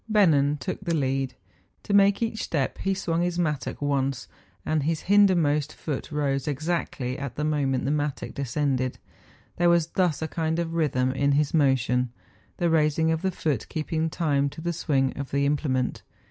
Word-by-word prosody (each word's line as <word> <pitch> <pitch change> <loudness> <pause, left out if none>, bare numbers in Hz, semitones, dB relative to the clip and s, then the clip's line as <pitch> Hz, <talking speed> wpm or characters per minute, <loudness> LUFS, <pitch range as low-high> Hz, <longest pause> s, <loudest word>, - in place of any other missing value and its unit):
Bennen 150 -9 +4
took 130 - -4
the 170 -3 0
lead; 135 -2 -1 0.5
to 205 - -3
make 200 +2 +5
each 225 -1 -2
step 140 -5 -2
he 195 0 0
swung 170 -3 -1
his 175 0 -1
mattock 150 -5 -2
once, 135 -2 -1 0.4
and 155 -1 +1
his 160 +2 -1
hindermost 170 -7 +3
foot 150 -2 -5
rose 140 -2 -1
exactly 150 -3 -2
at 140 -3 -5
the 150 - -2
moment 140 -4 0
the 140 - +1
mattock 150 -2 -2
descended; 135 -1 -1 0.6
there 175 0 +4
was 170 -1 +3
thus 180 -5 +1
a - - -1
kind 160 0 -1
of 170 -1 -2
rhythm 135 -6 +1
in 140 +1 +1
his 145 0 +1
motion, 125 -4 +2 0.5
the 175 - +1
raising 160 0 +2
of 160 0 0
the 190 - +1
foot 150 - -2
keeping 160 0 -1
time 145 -4 +1
to 140 - -11
the 170 +1 -2
swing 135 -5 0
of 140 - -4
the 140 0 +1
implement. 140 -3 0
150 Hz, 175 wpm, -26 LUFS, 135-165 Hz, 0.6 s, make